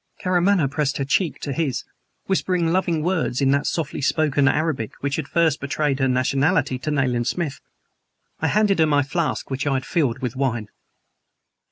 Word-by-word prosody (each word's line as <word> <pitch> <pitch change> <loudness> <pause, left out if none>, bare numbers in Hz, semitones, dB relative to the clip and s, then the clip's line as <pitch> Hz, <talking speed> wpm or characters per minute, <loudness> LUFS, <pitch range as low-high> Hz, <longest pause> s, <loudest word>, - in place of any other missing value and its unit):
Karamaneh 180 -1 +2
pressed 145 +1 -1
her 140 - -1
cheek 165 +4 0
to 140 - -3
his, 135 -5 -1 0.4
whispering 180 -3 0
loving 175 -4 +1
words 165 -8 0
in 135 -1 +3
that 140 +1 +1
softly 160 -4 -2
spoken 145 -1 +2
Arabic 145 -6 0
which 140 0 -1
had 155 -3 -3
first 165 -3 +1
betrayed 140 0 -1
her 135 - +2
nationality 135 +2 +1
to 130 - -4
Nayland 125 -5 0
Smith. 160 -1 -2 0.8
I - - 0
handed 210 -3 +2
her 160 - +5
my 145 -1 +3
flask, 155 +1 -2
which 135 +2 -2
I 140 - +2
had 130 - -2
filled 135 -8 0
with 130 -2 -4
wine. 120 -5 -1
145 Hz, 175 wpm, -22 LUFS, 135-165 Hz, 0.8 s, her